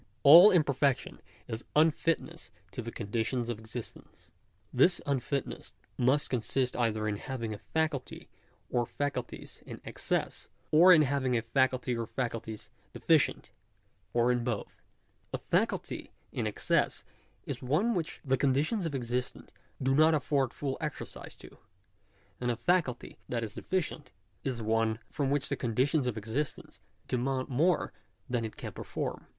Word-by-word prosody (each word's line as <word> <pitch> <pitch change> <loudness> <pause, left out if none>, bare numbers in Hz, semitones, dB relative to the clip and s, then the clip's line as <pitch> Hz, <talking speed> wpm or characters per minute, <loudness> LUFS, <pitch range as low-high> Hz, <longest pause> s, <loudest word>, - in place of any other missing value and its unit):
All 170 +8 +11
imperfection 140 -7 +1 0.3
is 110 +2 -5
unfitness 165 +1 +1 0.2
to - - -5
the 115 0 -6
conditions 115 +3 -2
of 115 -3 -3
existence. 110 +1 -9 0.4
This 175 +8 +4
unfitness 140 0 -2 0.2
must 130 +4 +2
consist 125 +1 0
either 110 -3 0
in 105 -1 -1
having 115 -3 -4
a 105 - -8
faculty 155 -2 -2 0.4
or 120 -1 +1
faculties 140 -4 -4
in - - -9
excess; - - -2 0.2
or 170 +4 +8
in 160 -4 +8
having 130 -3 +1
a 115 - -1
faculty 130 +1 +1
or 115 -1 -3
faculties 115 -3 -4 0.2
deficient; - - +2 0.6
or 120 +1 +3
in 120 -1 0
both. 115 -4 -4 0.5
A - - -1
faculty - - -1 0.2
in - - -2
excess, - - 0 0.4
is - - -5
one 160 - +1
which 170 -5 -3
the 135 -1 +2
conditions 145 - +1
of 145 - -4
existence 125 0 -3 0.3
do 135 0 +1
not 155 +3 +5
afford 135 -3 +1
full 135 -1 -4
exercise 155 -2 -6
to; - - -14 0.8
and 125 - -1
a 120 - +1
faculty 130 0 0
that 120 -2 -1
is 110 - -5
deficient, 160 -6 -3 0.3
is 125 -4 -3
one 110 0 +1
from 140 -2 -1
which 140 0 +1
the - - 0
conditions 130 +4 +1
of 120 -3 -2
existence 145 - -4 0.3
demand 130 +1 -1
more 160 +7 +2 0.3
than 120 -3 -1
it 110 - -6
can - - -6
perform. - - -5
130 Hz, 145 wpm, -30 LUFS, 120-150 Hz, 0.8 s, All